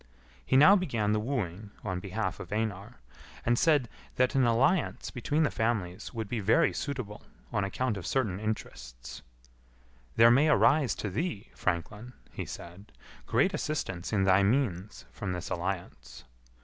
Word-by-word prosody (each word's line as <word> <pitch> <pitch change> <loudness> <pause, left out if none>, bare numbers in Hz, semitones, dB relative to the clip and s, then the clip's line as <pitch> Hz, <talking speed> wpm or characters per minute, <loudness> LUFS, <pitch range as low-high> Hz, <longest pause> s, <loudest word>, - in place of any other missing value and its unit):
He 100 - +2
now 170 +9 +8
began 120 - 0
the 110 - +1
wooing 105 -5 -3
on 90 -1 -2
behalf 95 -1 -3
of - - -9
Einar, 105 +1 -3 0.5
and 120 - +3
said 150 -6 +3 0.3
that 125 0 +2
an 135 -2 +3
alliance 135 +9 +1
between 145 +5 0
the 150 - +1
families 105 -6 -2
would 110 -3 -4
be 115 +2 -3
very 115 - +3
suitable 125 -8 -5 0.3
on 100 -3 +1
account 110 +3 -1
of 95 - -6
certain 105 -9 0
interests. - - -6 0.9
"There 115 +1 +7
may 140 +6 +4
arise 145 -2 +4
to 105 - -4
thee, 115 - -3
franklin," 105 +6 -3 0.2
he - - -6
said, 90 +5 -10 0.4
"great - - +2
assistance 95 - -3
in 100 -3 +2
thy 95 0 +5
means 105 - 0
from 90 +9 -4
this 90 - -6
alliance." 85 -10 -5
110 Hz, 150 wpm, -29 LUFS, 95-130 Hz, 0.9 s, now